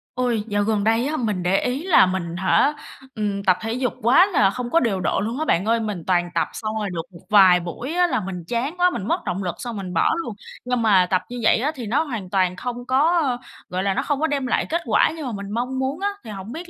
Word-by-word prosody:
Ôi, 240 -4 0
dạo 205 -1 0
gần 215 -1 0
đây 225 +3 +2
á 310 +1 -2
mình 210 -7 -2
để 185 +2 +2
ý 255 +5 -2
là 355 - +6
mình 180 -2 -3
hả, 190 +10 +3 0.4
ừm, 205 -2 -2
tập 185 -2 +3
thể 225 +1 -3
dục 255 0 -1
quá 260 - +6
là 255 - +3
không 240 +4 -4
có 335 - +5
điều 215 - 0
độ 180 - 0
luôn 230 +7 -3
á 315 - -1
bạn 185 - +1
ơi. 230 +1 +2
Mình 210 -6 -4
toàn 175 -1 +2
tập 165 - +1
xong 215 0 -4
rồi 205 -2 -2
được 165 - -2
một 170 - -13
vài 190 -4 +7
buổi 180 - -6
á 355 0 +3
là - - 0
mình 180 -2 -6
chán 260 - -2
quá, 360 0 +4
mình 215 - -5
mất - - 0
động 190 +1 -2
lực 175 -2 -3
xong 240 -3 -6
mình 185 -2 -6
bỏ 165 - +3
luôn. 230 -7 -6 0.3
Nhưng 250 -1 0
mà 200 -5 +4
tập 185 - +2
như 245 0 -6
vậy - - +5
á 275 +6 0
thì 250 -4 -6
nó 255 +9 +1
hoàn 230 - -6
toàn 185 -1 +1
không 245 +4 -5
có, 265 +5 +3
a, 255 -4 0 0.3
gọi 185 +1 -2
là, 195 -1 +1
nó - - 0
không 290 -2 -1
có 315 - +1
đem 280 -4 -1
lại - - +1
kết 335 +2 -1
quả - - +3
như 315 -3 -6
mà 250 - -3
mình 200 -1 -6
mong 250 +3 -2
muốn 270 +5 -2
á, 405 - 0
thì - - -10
hổng 195 +2 -8
biết 340 +6 -7
225 Hz, 280 wpm, -22 LUFS, 190-260 Hz, 0.4 s, vài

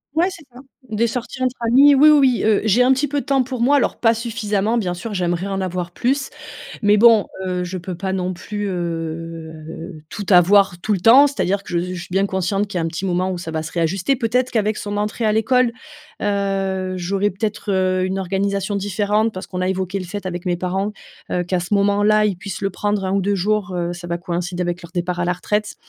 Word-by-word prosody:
Ouais, 340 +3 +3
c'est 340 -3 -11
ça. 250 - -12 0.3
Des 225 +2 +1
sorties 250 +2 -5
entre 255 0 0
amis 280 +3 +7
oui, 300 +3 +7
oui, 300 -1 +6 0.2
oui, - - -3
heu, 215 -1 +3
j'ai 220 +4 +4
un 255 - +4
petit 265 +3 +2
peu 285 0 -1
de - - -14
temps 270 -2 +2
pour 250 -1 -5
moi 285 +4 +4
alors, 275 - 0
pas 225 -1 +3
suffisamment 220 -1 -1
bien 185 -6 -1
sûr 210 +5 -6
j'aimerais 180 0 -1
en 195 -1 -2
avoir 180 -1 -3
plus, 270 +8 -1 0.5
mais 210 0 +4
bon, 225 -1 +6 0.2
heu, 180 -1 -2
je 180 +1 -5
peux 180 0 -6
pas 190 +1 -3
non 185 -1 -1
plus, 205 +3 -5
heu, 165 -1 -5
tout 205 - -5
avoir 190 0 +5
tout 215 - -1
le 195 - 0
temps, 250 +9 +7
c'est-à-dire 200 -8 -1
que - - -10
je 170 - +1
s 175 +1 -2
je 175 - -5
suis - - -11
bien 195 +1 +2
consciente 195 +2 -1
qu'il 190 - -3
y - - 0
a 165 - -1
un - - 0
petit 165 +3 -5
moment 185 +1 0
où 180 - -4
ça 170 -2 -6
va 160 0 -2
se 165 - -7
réajuster. 180 - 0
Peut-être 250 +1 0
qu'avec 215 -1 +1
son 205 0 -4
entrée 210 +2 -2
à 215 - +3
l'école, 235 +2 +2 0.5
heu, 195 -2 -1
j'aurais 195 +3 0
peut-être, 210 +1 -3
heu, 185 -1 +1
une 190 +1 -2
organisation 195 +2 -1
différente 205 +3 0
parce 185 - -6
qu'on 180 -1 -4
a 185 - 0
évoqué 190 +1 -2
le 185 - -5
fait 200 +2 -6
avec 180 0 -5
mes 175 - +1
parents, 190 +3 -2 0.4
heu, 180 - +1
qu'à 180 +1 -1
ce 180 +4 -2
moment-là, 205 +1 +3
ils 200 -4 -1
puissent 195 0 -7
le 195 0 -1
prendre 205 +1 -1
1 190 - -1
ou 200 - +2
2 200 +2 0
jours, 200 0 0
heu, 175 0 -2
ça 175 0 -8
va 170 0 -2
coïncider 175 0 -4
avec 175 0 -3
leur 170 - -12
départ 175 0 -2
à 175 - 0
la 175 - +1
retraite. 210 +4 -2
195 Hz, 245 wpm, -20 LUFS, 180-215 Hz, 0.5 s, amis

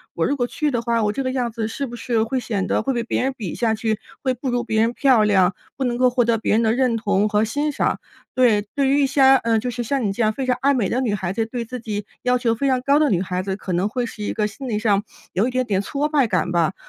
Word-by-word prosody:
我 - - +1
如 285 - 0
果 245 - +1
去 300 +1 -1
的 240 -2 -1
话， 230 -1 0
我 210 - +1
这 270 +2 -2
个 255 - -1
样 245 -3 -1
子 220 -1 -3
是 275 +5 -4
不 240 - -8
是 230 -1 0
会 255 +3 -1
显 210 -5 -2
得 - - +1
会 270 - 0
被 235 -1 -1
别 235 - -1
人 270 0 0
比 195 -8 -5
下 225 -2 +1
去， 220 -1 -1 0.2
会 260 -1 +1
不 255 +2 -4
如 245 0 0
别 220 -2 0
人 230 +2 +1
漂 255 -6 +4
亮， 190 -3 +3 0.2
不 270 - -2
能 240 -1 -1
够 255 0 +4
获 245 0 +2
得 230 -1 +2
别 220 - 0
人 225 - +3
的 220 0 +2
认 250 -2 +1
同 210 -2 +1
和 210 +1 +2
欣 290 +7 -1
赏？ - - 0 0.4
对， 235 -5 +4
对 275 -2 +2
于 285 +1 +3
一 275 - +3
些， 275 +1 0 0.2
呃， 230 -2 +1
就 250 - -3
是 240 0 -3
像 265 +1 -1
你 195 - 0
这 230 - -3
样 215 - +3
非 265 +2 -3
常 250 -1 +1
爱 280 +1 +3
美 225 -7 +1
的 255 - 0
女 230 -5 0
孩 190 -2 -2
子， 225 +1 -1
对 235 0 -5
自 250 +2 -6
己 210 -2 -4 0.2
要 250 0 +3
求 230 -2 0
非 275 +4 -1
常 255 -1 +1
高 280 +2 +3
的 305 - +3
女 185 -3 +1
孩 185 -1 -2
子， 190 -1 -2
可 185 - -5
能 185 +4 +1
会 245 +1 -2
是 215 -2 -7
一 - - -2
个 210 -1 0
心 255 +6 -8
理 210 -2 -1
上， 205 -2 +2 0.3
有 200 +6 +1
一 255 - -3
点 255 0 0
点 195 -3 0
挫 285 +7 -2
败 285 -5 +2
感 180 -3 0
吧。 170 +1 +1
235 Hz, 330 characters per minute, -21 LUFS, 210-255 Hz, 0.4 s, 漂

